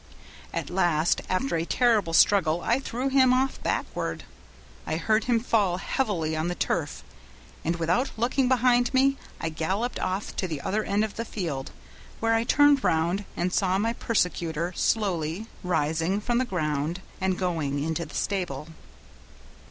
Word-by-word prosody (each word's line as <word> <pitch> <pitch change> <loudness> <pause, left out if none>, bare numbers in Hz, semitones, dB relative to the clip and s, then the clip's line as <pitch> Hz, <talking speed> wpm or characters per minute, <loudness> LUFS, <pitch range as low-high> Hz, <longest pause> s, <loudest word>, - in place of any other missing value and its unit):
At - - -4
last 175 -3 +2
after 185 +4 0
a 165 - 0
terrible 215 -3 +2
struggle 175 -2 +4
I 235 +7 +1
threw 265 0 -2
him 260 -1 +5
off 260 +1 +1
backward. - - -2 0.6
I 155 - -1
heard 215 +6 +1
him 240 -2 +2
fall 210 -6 +1
heavily 185 -7 -1
on 155 +2 -1
the 175 - -2
turf, - - -2 0.6
and 165 +2 0
without 175 - +1
looking 250 +3 +1
behind 245 -1 +3
me, 275 +1 +4 0.2
I 165 - -2
galloped 190 +10 -2
off 185 +2 -3
to 185 - -1
the 155 -4 -4
other 215 +3 -1
end 205 +1 +1
of 215 -2 -4
the 230 - -1
field; 165 -12 -4 0.5
there 225 0 +2
I 225 0 +2
turned 290 -1 +5
round 170 +5 +1
and 180 +1 -1
saw 190 -1 +2
my 225 +3 0
persecutor 175 -7 -1
slowly 185 -3 0 0.2
rising 165 +2 0
from 240 +3 0
the 255 - +1
ground 155 - -2 0.2
and 190 -1 +1
going 160 -6 -1
into 160 +2 -2
the 150 -2 -10
stable. 165 -7 -2
190 Hz, 160 wpm, -26 LUFS, 165-230 Hz, 0.6 s, him